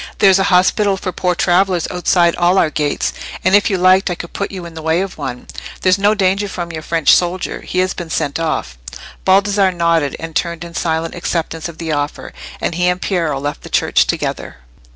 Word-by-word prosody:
There's 195 -1 +5
an 195 - +2
hospital 195 +2 +3
for 185 - -4
poor 180 0 -1
travellers 180 0 +2
outside 175 -1 +2
all 175 +2 +2
our 160 -4 +3
gates, 150 -2 -1 0.3
and, 185 +2 +4
if 205 - +4
you 195 - 0
liked, 185 +1 +4
I 180 - -2
could 170 - -9
put 200 - -3
you 185 -3 -7
in 170 - -9
the 160 - -8
way 160 +3 +1
to 195 - -1
one. 130 -4 -6 0.4
There's 185 +1 +3
no 205 +2 +3
danger 195 0 +1
from 175 -3 -5
your 160 -1 -6
French 165 -1 +3
soldier. 180 +1 -1
He - - -6
has 185 - -4
been 175 -2 -7
sent 145 -1 -2
off." 155 - -3 0.5
Baldassarre 195 0 +3
nodded, 165 -4 +1
and 165 -1 -7
turned 170 -1 -2
in 170 -1 -9
silent 165 -1 -2
acceptance 165 -1 -3
of 165 - -11
the 165 -2 -4
offer, 145 0 -3 0.3
and - - -2
he 180 +2 0
and 180 0 +1
Piero 165 -8 -1
left 145 +1 -4
the - - -11
church - - +2
together. - - -3
175 Hz, 215 wpm, -17 LUFS, 165-190 Hz, 0.5 s, There's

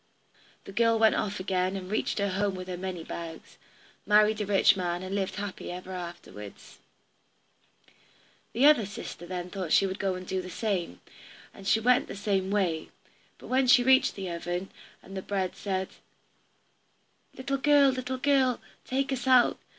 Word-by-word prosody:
The - - -10
girl 230 +3 +3
then - - 0
went 220 -1 +5
off 205 -1 -2
again, 185 0 -1
and 190 0 -6
reached 215 - -1
her 200 -1 +1
home 195 +1 0
with 185 0 -7
her 180 - -4
money 180 -2 -5
bags, 165 0 -8 0.5
married 210 +1 +4
a 205 - -3
rich 200 -1 +5
man, 175 -1 -2
and 185 +1 -5
lived 195 -2 -2
happy 200 -3 -5
ever 180 +1 -8
afterwards. 170 - -9 1.7
The 250 +4 +3
other 290 -9 +6
sister 175 -3 -8
then 180 0 -5
thought 185 -5 -4
she - - +5
would 190 +1 -4
go 190 -2 0
and 185 0 -7
do 190 0 -2
the 180 - -9
same. 180 - -3 0.5
And 195 - -10
she 220 - +4
went 250 +4 +3
the - - -7
same 195 -2 -1
way. 185 -6 0 0.5
But - - -13
when 260 0 +2
she 245 0 +6
reached 260 +1 +4
the 190 -3 -5
oven, 175 +2 -4 0.3
and 195 - -11
the 190 - -3
bread 190 -2 -2
said, 190 -2 -3 1.5
"Little 275 +1 -2
girl, 285 0 +5
little 255 0 -4
girl, 265 -2 +2 0.3
take 270 +1 -1
us 250 -1 -4
out. 255 -2 +5
195 Hz, 175 wpm, -28 LUFS, 185-235 Hz, 1.7 s, other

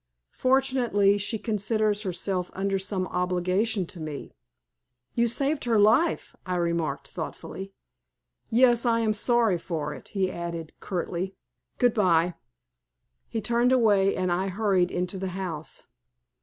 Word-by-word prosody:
Fortunately 255 -6 +3
she 205 +3 -1
considers 215 -1 0
herself 185 -1 -2
under 195 0 0
some 190 -1 -1
obligation 185 +3 0
to 175 +1 -11
me." 155 -3 -6 0.8
"You 235 0 +2
saved 275 +5 0
her 230 -2 +3
life," 225 +11 +3
I 185 - -2
remarked, 170 -5 -1
thoughtfully. 190 +3 -6 0.8
"Yes, 240 0 +4
I 230 -1 +2
am 220 -1 +2
sorry 225 -4 +2
for 155 -3 -3
it," 135 - -11
he 190 -2 -1
added, 170 -2 -5
curtly. 180 +1 -3 0.4
"Goodbye." 180 -8 +3 0.9
He 225 - -3
turned 235 +3 +2
away 205 -6 +4
and 185 -1 0
I 185 +2 0
hurried 190 -2 +1
into 180 +2 -3
the 190 - -2
house. 165 -5 -5
195 Hz, 130 wpm, -26 LUFS, 180-225 Hz, 0.9 s, Yes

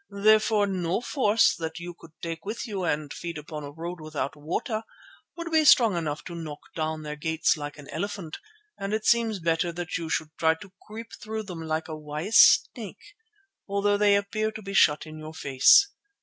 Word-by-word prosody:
Therefore 215 +1 +3
no 185 -2 -1
force 230 -3 +3
that 160 0 -5
you 175 +1 -7
could 165 -1 -17
take 165 -1 -5
with 215 +5 -4
you 200 -5 -4
and 150 -2 -2
feed 170 -2 -6
upon 150 0 -7
a 145 - -6
road 165 +3 -7
without 150 -3 -4
water 165 +9 -3 0.6
would 335 0 -5
be 315 -1 +4
strong 230 -8 +6
enough 155 -3 -3
to 175 - -8
knock 160 -3 -7
down 155 -1 -2
their 150 0 -5
gates 160 0 +1
like 145 -1 -7
an 145 -1 -12
elephant, 195 -2 -5 0.4
and 195 +2 -2
it 215 0 -4
seems 230 -3 +3
better 165 +1 0
that 170 -1 -4
you 165 -1 -5
should 155 0 -2
try 160 0 +3
to 185 +3 -14
creep 225 +2 -9
through 220 0 -4
them 180 -5 -7
like 160 0 -2
a 160 - -5
wise 155 +8 -1
snake, 235 - +3 0.5
although 200 0 +1
they 205 0 +4
appear 215 +2 -1
to 220 0 -9
be 195 0 -6
shut 150 -6 +4
in 155 0 -10
your 155 +1 -9
face. 150 - +5
170 Hz, 195 wpm, -26 LUFS, 155-210 Hz, 0.6 s, strong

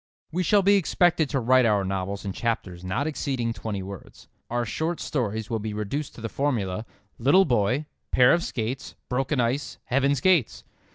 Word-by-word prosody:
We 175 +3 0
shall 200 +3 +3
be 200 +1 +5
expected 175 -4 +2
to 140 - 0
write 125 0 +4
our 105 -3 +2
novels 95 +1 -3
in 95 - -3
chapters 95 -7 -3
not 95 +10 -1
exceeding 130 -6 -2
twenty 105 -4 -4
words. 100 -1 -10 0.2
Our 120 0 -1
short 160 +10 -2
stories 110 -5 -2
will 115 - 0
be 105 0 -4
reduced 115 +8 -3
to - - -10
the 115 - -2
formula: 110 -6 -2 0.3
"Little 145 +11 +5
boy. 125 +3 +1 0.2
Pair 125 0 +5
of 170 0 +1
skates. 125 +2 -4
Broken 135 +3 0
ice, 125 +5 -1
Heaven's 140 +1 +1
gates." 175 -5 +2
125 Hz, 175 wpm, -25 LUFS, 105-145 Hz, 0.3 s, be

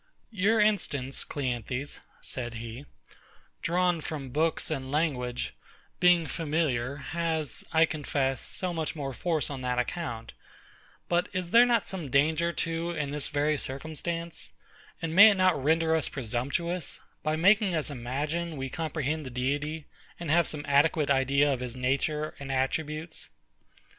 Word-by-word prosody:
Your 215 +2 +2
instance, 145 -11 +1
CLEANTHES, 130 0 -3 0.2
said 120 -2 -4
he, 115 +5 -7 0.7
drawn 175 -1 +1
from 140 -4 -5
books 160 +3 0
and 135 -3 -3
language, 130 -6 -1 0.5
being 175 -2 +5
familiar, 145 -6 -1
has, 155 0 -1
I 160 0 +5
confess, 140 -4 -1
so 180 -2 0
much 160 0 -2
more 140 -3 -4
force 160 +2 0
on 135 -2 -5
that 125 -1 -1
account: 125 -3 -3 0.7
but 175 0 +1
is 180 -2 -3
there 240 +1 +7
not 235 -1 +2
some 175 -7 -5
danger 155 +5 +3
too 165 0 -2
in 150 -4 -2
this 145 -1 -2
very 150 +1 +1
circumstance; 160 +4 -4 0.5
and 160 -1 -2
may 205 +5 +10
it 205 - +3
not 185 -7 +3
render 160 +2 +3
us 160 - 0
presumptuous, 140 +7 -2 0.2
by 155 0 0
making 195 +2 +4
us 155 -2 -1
imagine 145 +6 -3
we 135 0 -3
comprehend 155 -1 -2
the 130 - -6
Deity, 145 +5 -2 0.3
and 170 -3 -3
have 170 0 +4
some 150 -1 -4
adequate 145 +1 +3
idea 140 +1 +3
of 130 - -3
his 125 -1 -4
nature 140 +4 0
and 140 -1 -5
attributes? 155 +4 -2
150 Hz, 145 wpm, -28 LUFS, 135-170 Hz, 0.7 s, may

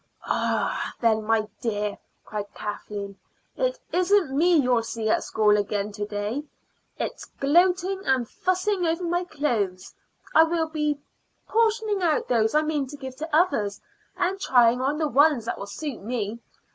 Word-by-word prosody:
"Arrah, - - -1
then, 220 -2 +2
my 220 -1 +2
dear!" 210 -3 -2 0.3
cried 205 -1 -5
Kathleen, 205 -1 -6 0.4
"it - - 0 0.2
isn't 360 -5 +3
me 345 +4 +4
you'll 250 -6 +3
see 225 -1 -4
at - - +2
school 210 -1 +3
again 205 0 -1
to 205 0 -4
day. 210 +6 -3 0.6
It's - - -4
gloating 360 +6 +3
and 260 -3 +2
fussing 370 - 0
over 330 +2 0
my 350 +1 0
clothes 210 - -2 0.4
I - - +8
will 325 -1 -1
be 300 -2 -1 0.5
portioning 440 -2 +1
out 325 -4 +1
those 225 0 +2
I 305 - +4
mean 300 -3 -1
to 290 - -9
give 265 -2 -7
to 315 +2 -5
others, 215 - +2 0.4
and 375 +2 0
trying 245 -6 +4
on 280 +3 0
the 310 -1 +1
ones 285 -4 +4
that - - -3
will 200 - -6
suit 285 +3 -5
me. 220 0 -3
275 Hz, 160 wpm, -25 LUFS, 220-345 Hz, 0.6 s, I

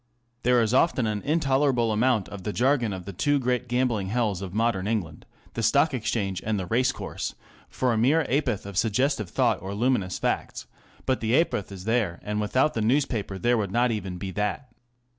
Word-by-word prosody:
There 125 -1 +4
is 110 +1 0
often 130 -2 +3
an 105 -1 -1
intolerable 135 -6 +2
amount 110 -2 +2
of 100 - -8
the 105 - -3
jargon 125 -1 +1
of 95 -2 -6
the 100 - -7
two 145 +11 +1
great 125 -1 -1
gambling 120 -5 0
hells 105 -3 0
of 95 -2 -5
modern 105 -2 0
England 105 -8 -3
ŌĆö - - -30
the 115 - -3
Stock 140 +7 +3
Exchange 105 -6 -2
and 110 -2 -1
the 95 - -3
race 125 +7 +2
course - - -5
ŌĆö - - -27
for 125 -2 0
a' 110 - 0
mere 145 +8 +3
ha'porth 130 -8 0
of 100 -1 -2
suggestive 115 - 0
thoughts - - +1
or 95 +2 -5
luminous 110 -5 0
facts; - - -2 0.4
but 130 - +1
the 115 +4 +2
ha'porth 105 - -1
is 95 -2 -8
there, 110 -6 0
and 105 0 -2
without 130 +8 +2
the 110 - -2
newspaper 115 -5 0
there 120 +4 +2
would 100 -3 -1
not 120 +3 +2
even 95 -5 -4
be 95 +1 -5
that. 105 +7 -2
115 Hz, 205 wpm, -26 LUFS, 100-130 Hz, 0.4 s, There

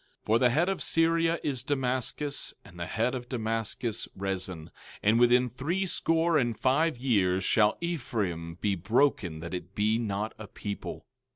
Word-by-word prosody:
17:8 - - -43
For 110 +2 +3
the 125 - +5
head 160 +8 +2
of 195 -1 -1
Syria 165 0 +2
is 135 -4 -1
Damascus, 135 +1 -1
and 90 -3 -13
the 85 - -3
head 115 +6 0
of 120 -2 -5
Damascus, 115 -1 -2
Rezin; 95 -4 -4 0.3
and 110 +3 +4
within 125 +1 +5
three 160 +11 -2
score 165 -2 +2
and 120 -4 -1
five 150 +3 +2
years 100 -7 +2
shall 105 +2 +3
Ephraim 105 - -2
be 100 +3 0
broken 95 - +1
that 85 +2 -6
it 90 +1 -6
be 110 +2 +2
not 105 -1 -2
a 110 - -7
people. 100 0 -6
115 Hz, 165 wpm, -29 LUFS, 100-140 Hz, 0.3 s, the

